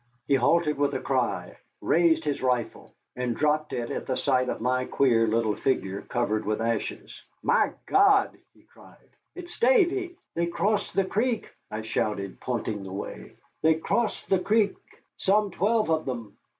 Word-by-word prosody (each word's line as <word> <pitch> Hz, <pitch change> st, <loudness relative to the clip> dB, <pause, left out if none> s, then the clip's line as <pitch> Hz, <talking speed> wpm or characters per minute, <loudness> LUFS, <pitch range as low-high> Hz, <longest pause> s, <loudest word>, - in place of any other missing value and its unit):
He -, -, +2 dB
halted 150 Hz, +3 st, +2 dB
with 145 Hz, -1 st, +1 dB
a -, -, 0 dB
cry, -, -, -1 dB, 0.2 s
raised 165 Hz, -2 st, +3 dB
his 145 Hz, -2 st, -1 dB
rifle, 125 Hz, -3 st, -2 dB, 0.2 s
and 125 Hz, -2 st, -2 dB
dropped 150 Hz, 0 st, +1 dB
it 120 Hz, -1 st, -3 dB
at -, -, -4 dB
the 130 Hz, -, 0 dB
sight 130 Hz, 0 st, +1 dB
of -, -, -3 dB
my 130 Hz, +2 st, 0 dB
queer 115 Hz, -5 st, +3 dB
little 110 Hz, -1 st, +1 dB
figure 100 Hz, -6 st, -1 dB
covered 110 Hz, -3 st, -1 dB
with 110 Hz, 0 st, -1 dB
ashes. 115 Hz, +1 st, -3 dB, 0.2 s
"My -, -, +2 dB
God!" 400 Hz, 0 st, +4 dB, 0.2 s
he -, -, -24 dB
cried, -, -, -19 dB, 0.4 s
"it's 355 Hz, -1 st, -10 dB
Davy." 390 Hz, -7 st, +3 dB, 0.2 s
"They 170 Hz, 0 st, 0 dB
crossed 200 Hz, +4 st, -1 dB
the 195 Hz, -, +3 dB
creek," 225 Hz, +4 st, -1 dB, 0.2 s
I 110 Hz, +1 st, -5 dB
shouted, 105 Hz, -3 st, -2 dB
pointing 110 Hz, -4 st, -3 dB
the 95 Hz, -1 st, -8 dB
way, 100 Hz, +2 st, -7 dB, 0.3 s
"they 160 Hz, 0 st, +4 dB
crossed 220 Hz, +7 st, -1 dB
the 190 Hz, -, +3 dB
creek, 210 Hz, +1 st, +2 dB, 0.4 s
some 205 Hz, +1 st, +2 dB
twelve 210 Hz, +1 st, +1 dB
of 160 Hz, 0 st, +1 dB
them." 120 Hz, -5 st, -5 dB
145 Hz, 165 wpm, -26 LUFS, -, 0.4 s, God